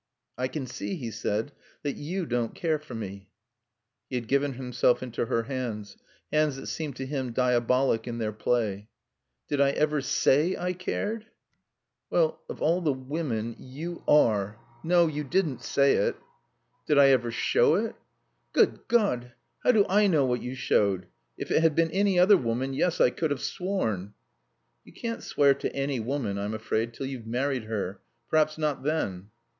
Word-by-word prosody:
"I 130 +1 -1
can 140 0 -4
see," 130 +9 -4
he 120 -9 -5
said, 110 +4 -2 0.3
"that 145 -2 -2
you 175 +5 -3
don't 120 -4 -1
care 160 -3 0
for 135 -5 -10
me." 100 -3 -7 0.8
He 130 - -4
had 120 -2 -3
given 140 +2 +1
himself 125 -1 +1
into 120 -2 -3
her 115 - +1
hands 115 -5 -4 0.4
hands 155 -2 +2
that 135 - -8
seemed 150 -5 -4
to 135 - -5
him 130 -3 -3
diabolic 125 -1 +2
in 120 -1 -4
their 110 -2 -1
play. 105 -1 -1 0.6
"Did 145 -1 0
I 140 - +5
ever 150 +1 +1
say 145 +5 +2
I 180 +1 -1
cared?" 210 +4 -3 0.8
"Well 160 -2 +1
of - - -5
all 170 +4 +3
the 155 -4 +2
women 130 -4 -3
you 160 +7 -7
are! 110 -8 +3 0.3
No, 175 +1 +4
you 150 -2 -2
didn't 150 0 0
say 140 0 +3
it." - - +1 0.7
"Did 150 - +3
I 140 -1 +8
ever 125 -3 +3
show 450 - +3
it?" - - -1 0.6
"Good - - +2
God, 125 - +1 0.3
how - - +6
do 210 -4 +4
I 205 +2 +4
know 155 -7 +3
what 125 -1 0
you 125 +1 -5
showed? 100 -7 +1 0.3
If - - -5
it - - +4
had 160 -2 +3
been 165 -1 +2
any 195 +1 +2
other 190 +3 +7
woman 125 0 -2
yes, 170 +5 0
I 125 - +5
could 160 +3 -1
have 145 -2 -1
sworn." 110 - -2 0.7
"You - - -17
can't 230 -1 -4
swear 140 -1 +3
to 135 - -4
any 135 -1 -1
woman 115 -4 -2
I'm 105 +2 -2
afraid 110 +1 -2
till 135 - -4
you've 130 -4 -6
married 125 0 -1
her. 100 -3 -4 0.3
Perhaps 155 0 +3
not 150 -2 -1
then." 105 - -2
135 Hz, 175 wpm, -27 LUFS, 115-155 Hz, 0.8 s, I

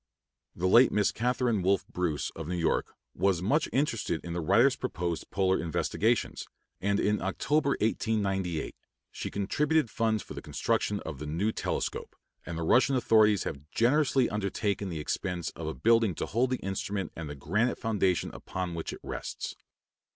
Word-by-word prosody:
The 90 - -2
late 120 +7 +6
Miss 105 -1 +2
Catharine 120 -2 0
Wolfe 95 +1 +2
Bruce, 85 -6 -2
of 80 -2 -7
New 90 - -2
York, 85 -1 0 0.2
was 95 -1 +1
much 145 +10 +2
interested 115 - 0
in 85 - -4
the 85 - -2
writer's 115 - +4
proposed 90 -9 -3
polar 95 -1 +1
investigations, 105 +7 0 0.3
and 100 +1 +1
in 105 0 +1
October, 145 -1 +1
1898, 95 -6 0 0.4
she - - -5
contributed 145 +7 +1
funds 110 -2 0
for - - -9
the - - -6
construction 105 -1 -1
of 75 -5 -7
the 75 - -5
new 90 +8 0
telescope, - - -3 0.3
and 85 - -4
the 85 - -2
Russian 130 - +4
authorities 110 -5 +4
have 70 +2 -6
generously 135 - +3
undertaken 100 -1 -2
the 80 -3 -4
expense 85 +2 -2
of 80 - -7
a 80 - -3
building 115 -5 +3
to - - -2
hold 120 +4 +1
the 130 - 0
instrument 95 -1 -3
and 80 -2 -6
the 75 - -6
granite 105 - 0
foundation 100 -5 0
upon 90 -1 -4
which 80 -1 -4
it - - -9
rests. - - -5
100 Hz, 165 wpm, -29 LUFS, 85-115 Hz, 0.4 s, late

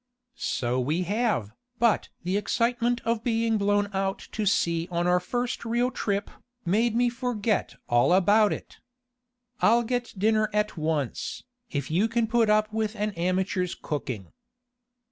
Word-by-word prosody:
"So 125 - -1
we 155 +8 0
have, 205 - 0 0.3
but 235 -2 +2
the 180 +2 -1
excitement 235 +3 +1
of 230 -1 0
being 225 -2 +1
blown 205 0 +2
out 195 0 0
to 215 -1 -2
sea 170 -3 +1
on 175 -1 -1
our 180 0 +4
first 245 +7 -3
real 240 +2 +1
trip, 205 -4 -2 0.3
made 220 +6 +2
me 245 +1 +3
forget 235 -4 -1
all 120 +6 +3
about 205 +3 +5
it. - - -7 0.8
I'll 235 +2 +4
get 245 0 -3
dinner 215 +1 +2
at 210 0 0
once, 155 -5 -2 0.3
if 145 0 -3
you 190 +7 +3
can 230 0 +1
put 230 0 +2
up 215 0 +2
with 220 0 -1
an 210 0 -1
amateur's 185 0 -1
cooking." 120 - -5
210 Hz, 145 wpm, -26 LUFS, 180-230 Hz, 0.8 s, about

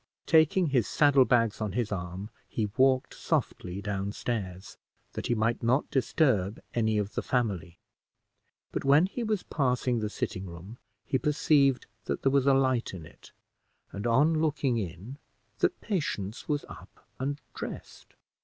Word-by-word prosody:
Taking 165 +4 +4
his 125 -6 +2
saddle 145 -3 +5
bags 115 -4 +2
on 105 -3 -2
his 115 -3 -1
arm, 95 +2 -5 0.2
he 105 -3 -2
walked 130 -1 +3
softly 90 +3 -2
down 100 0 -2
stairs, 95 -7 -4 0.4
that - - -4
he 120 - +1
might 115 +2 0
not 125 +4 +1
disturb 125 - +1
any 110 -2 +1
of 105 0 -2
the - - -1
family; 95 -9 -1 0.9
but - - -3
when 145 +5 +5
he 200 +6 -5
was 215 -4 -1
passing 125 -4 0
the 105 -1 -2
sitting 95 -2 -4
room, 90 +7 -10 0.3
he 130 - 0
perceived 140 -3 +3 0.2
that - - -3
there 135 - +3
was 140 -1 +3
a 140 - +6
light 130 -6 +1
in 85 -4 -8
it, - - -16 0.6
and, 100 +4 -4
on 150 +7 +3
looking 140 -6 +1
in, 100 - -7 0.4
that - - +1
Patience 145 - -3
was 145 -1 0
up - - -14
and 140 +2 -2
dressed. - - -8
120 Hz, 155 wpm, -29 LUFS, 100-140 Hz, 0.9 s, a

